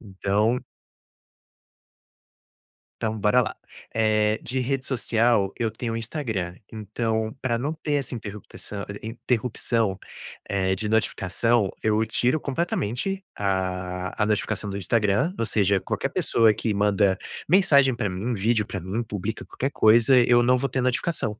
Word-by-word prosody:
Então 105 +4 0 2.4
Então, 110 0 -1
bora 105 +5 +3
lá. 110 - -3 0.4
Eh, 110 -1 +2
de 130 +2 -2
rede 130 +1 -1
social 115 -5 +1
eu 115 -3 -1
tenho 115 0 -4
Instagram, 110 - -3
então 110 +1 -2
pra 120 -3 0
não 140 +6 -2
ter 155 -2 -3
essa 140 -3 -1
interruptação- 105 -2 -7 0.2
interrupção, 115 -2 -1 0.5
eh, 95 -1 +1
de 105 +2 -3
notificação, 110 0 +1
eu 110 0 +2
tiro 125 +7 +1
completamente 170 - -2
a 95 -2 -2
a - - +4
notificação 105 -1 -1
do 100 - -5
Instagram, 105 - +1
ou 115 - +1
seja, 100 -2 +2
qualquer - - -2
pessoa 115 -2 +3
que 110 0 -2
manda 100 -1 +2 0.3
mensagem 145 -8 +5
pra 110 -5 -1
mim, 100 +7 -3
vídeo 110 +1 +1
pra 95 - -5
mim, 95 +6 -2
publica 105 -1 -5
qualquer 135 - -3
coisa, 115 +3 +5
eu 120 0 +5
não 125 +1 +4
vou 135 +2 -1
ter 130 0 -1
notificação. 125 -3 -1
110 Hz, 135 wpm, -25 LUFS, 100-125 Hz, 2.4 s, mensagem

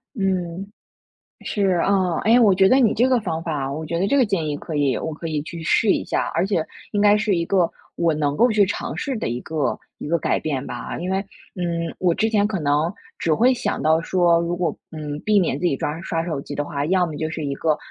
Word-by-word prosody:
嗯。 190 -2 -2 0.7
是， 205 -2 0 0.2
啊， 185 -4 +1
哎， 230 +3 +5
我 210 -5 +5
觉 190 +1 +5
得 255 - +5
你 240 -5 +4
这 240 +3 +3
个 255 -2 +3
方 165 -6 -3
法 150 -5 -2
我 155 +3 -4
觉 170 +2 -2
得 190 - +1
这 280 - +2
个 265 - +5
建 185 -8 -1
议 145 - -2
可 160 - -7
以 140 -3 +1
我 160 - -3
可 165 +2 -6
以 150 -2 -2
去 165 +1 -8
试 205 +5 +3
一 - - -1
下。 - - -2
而 170 +3 +1
且 175 -6 0 0.3
应 205 - +1
该 205 0 +6
是 210 -2 +1
一 170 - 0
个 180 -1 +2 0.2
我 165 -2 +1
能 145 -2 0
够 240 +10 +4
去 210 -2 +4
尝 195 - -4
试 280 -3 -2
的 - - -2
一 120 - -2
个 155 -2 -1 0.2
一 - - -6
个 170 +2 +2
改 - - 0
变 140 -3 -3
吧。 - - -5
因 180 +2 -3
为， 190 - +1 0.4
嗯， 170 -2 -2
我 180 -2 +2
之 220 +4 +1
前 205 -2 +3
可 210 -2 -2
能 150 +1 +1 0.3
只 160 - +1
会 245 +10 +4
想 250 - -2
到 160 +1 +3
说， 170 -1 +3
如 170 +1 -2
果， 175 -3 -1 0.2
嗯， 150 -2 -5
避 215 -1 +4
免 170 -7 +1
自 180 - +1
己 140 - +1
刷 150 +4 -3
刷 165 -2 -2
手 160 -5 -3
机 145 - -7
的 145 - -2
话， 145 -1 -3
要 185 +2 +3
么 160 -3 -5
就 155 - -1
是 160 -1 -5
一 140 -1 -2
个 155 0 +1
170 Hz, 270 characters per minute, -22 LUFS, 155-200 Hz, 0.7 s, 该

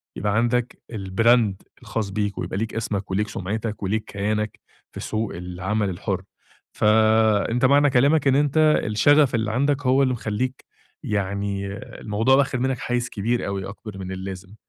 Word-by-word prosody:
يبقى 105 0 -1
عندك 120 +1 0 0.2
الbrand 110 +2 +3 0.3
الخاص 110 -3 -3
بيك 105 0 -2
ويبقى - - -3
ليك 110 +1 -3
أسمك 105 -3 -3
وليك 105 +3 0
سُمعتك 105 +1 -4
وليك 105 +3 0
كيانك 105 +1 -2 0.3
في - - -9
سوق 110 -1 -3
العمل 95 +4 -2
الحر. 90 - -3 0.5
فأنت 110 +2 +3
معنى 145 +2 +5
كلامك 140 +4 +3
إن 135 - +4
أنت 145 +1 +1 0.3
الشغف 130 +6 +4
اللي 110 -1 -1
عندك 140 +3 0
هو 135 +2 +4
اللي 130 - +2
مخلّيك 120 +2 -3 0.4
يعني 100 -1 -2 0.3
الموضوع 110 +5 +2
واخد 135 -2 +1
منك 130 -1 -1
حيز 120 -1 -2
كبير 120 +3 -1
أوي، 100 -1 -3
أكبر 105 -1 -9
من 95 -1 -6
اللازم. 95 +1 -7
110 Hz, 150 wpm, -23 LUFS, 100-125 Hz, 0.5 s, معنى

